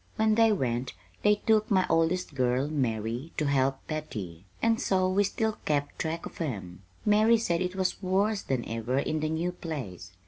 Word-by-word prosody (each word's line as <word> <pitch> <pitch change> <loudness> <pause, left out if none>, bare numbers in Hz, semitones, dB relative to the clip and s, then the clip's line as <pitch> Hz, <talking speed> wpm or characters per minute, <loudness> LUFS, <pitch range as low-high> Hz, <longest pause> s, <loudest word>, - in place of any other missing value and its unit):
When 220 0 +3
they 225 0 +5
went 125 - -1 0.3
they 210 0 +5
took 215 -1 +3
my 190 -2 +3
oldest 165 +1 +1
girl, 130 +1 +1
Mary, 120 0 -2
to 155 - +1
help 135 -1 +1
Betty; 105 - -6
and 225 0 +2
so 185 -1 +2
we 190 +2 +3
still 220 +2 -1
kept 145 -1 -1
track 160 +1 -2
of - - -8
'em. 95 - -4 0.2
Mary 215 +2 +5
said 175 -6 0
it 180 0 -2
was 190 +1 -1
worse 195 +3 +1
than 130 -3 -2
ever 115 +3 -2
in 155 +3 0
the 155 0 -1
new 165 +3 -1
place. 125 - -6
155 Hz, 180 wpm, -28 LUFS, 130-195 Hz, 0.3 s, they